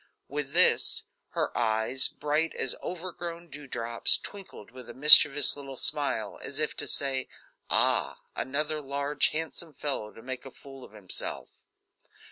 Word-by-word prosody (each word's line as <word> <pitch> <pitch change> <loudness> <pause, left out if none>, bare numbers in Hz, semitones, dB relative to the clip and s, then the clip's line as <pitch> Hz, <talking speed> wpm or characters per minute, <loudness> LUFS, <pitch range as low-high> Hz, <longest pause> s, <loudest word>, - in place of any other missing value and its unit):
With 145 0 -5
this, 180 +2 +4 0.3
her - - -3
eyes, 110 +3 +2
bright 150 +2 -3
as - - -1
overgrown 170 -1 -7
dew 145 -1 -11
drops, 115 -2 +1
twinkled 195 - -11
with 125 -1 -13
a 120 - -10
mischievous 145 0 +8
little 135 -2 -10
smile, - - +1
as - - -5
if - - -2
to - - -3
say: 135 -2 -1 0.4
"Ah, - - +1 0.2
another 150 +4 -2
large 140 +1 0
handsome 160 0 -6
fellow 130 -8 -4
to 115 - -16
make 130 0 -6
a 135 - -10
fool 135 0 -14
of 105 - -15
himself." 100 -4 -3
140 Hz, 145 wpm, -27 LUFS, 125-150 Hz, 0.4 s, mischievous